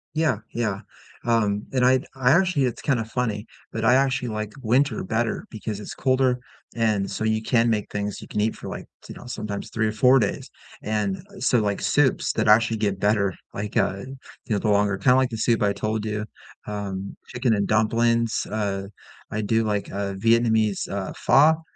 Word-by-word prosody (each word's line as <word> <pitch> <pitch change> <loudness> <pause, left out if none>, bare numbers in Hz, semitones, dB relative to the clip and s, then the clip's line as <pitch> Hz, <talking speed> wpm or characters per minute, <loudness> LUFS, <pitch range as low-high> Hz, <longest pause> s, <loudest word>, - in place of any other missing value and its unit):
Yeah, 155 -8 +1
yeah, 105 -4 -1 0.4
um, 105 -3 +1
and 125 -2 +2
I 130 0 +4
I 130 -1 +3
actually 170 -3 +3
it's 120 -2 -3
kinda 125 -6 0
funny, 115 -2 -2 0.3
but 110 0 -2
I 115 - +6
actually 135 -1 +1
like 110 -1 -4
winter 130 +5 +1
better 110 +3 -1
because 110 -1 -5
it's 105 - -8
colder 130 -1 +2 0.4
and 110 -4 +1
so - - -4
you 110 0 +1
can 115 0 +2
make 105 -3 -1
things 105 -1 -3
you - - -10
can - - -2
eat 110 +2 +1
for, - - -8
like, - - -6 0.2
t - - -10
you - - -12
know, - - -12
sometimes 105 -4 -5
3 110 -1 0
or - - 0
4 125 +5 +5
days, 105 -4 -2 0.3
and, 105 -3 -1 0.2
so, 125 - +3
like, 105 -2 -1
soups 130 +6 +2
that - - 0
actually 115 +1 +5
get 100 -2 0
better, 100 -1 +1 0.2
like, 105 +2 -5
uh, 95 -3 +2 0.5
you - - -9
know, - - 0
the 110 - -1
longer 100 -1 +2
kinda 125 +6 +4
like 130 -1 +3
the 115 - -5
soup 115 +1 +1
I 100 -1 +2
told 110 +1 -2
you, 105 0 -2 0.4
um, 100 -2 -5
chicken 125 -1 0
and 100 -1 0
dumplings. 115 +2 +2
Uh, 100 -2 -2 0.4
I 110 - -1
do, 110 +2 +1
like, 105 -2 -2
uh, 100 0 -3
Vietnamese, 110 0 +2
uh, 100 -1 -4
pho, 155 +4 +4
110 Hz, 195 wpm, -24 LUFS, 105-120 Hz, 0.5 s, I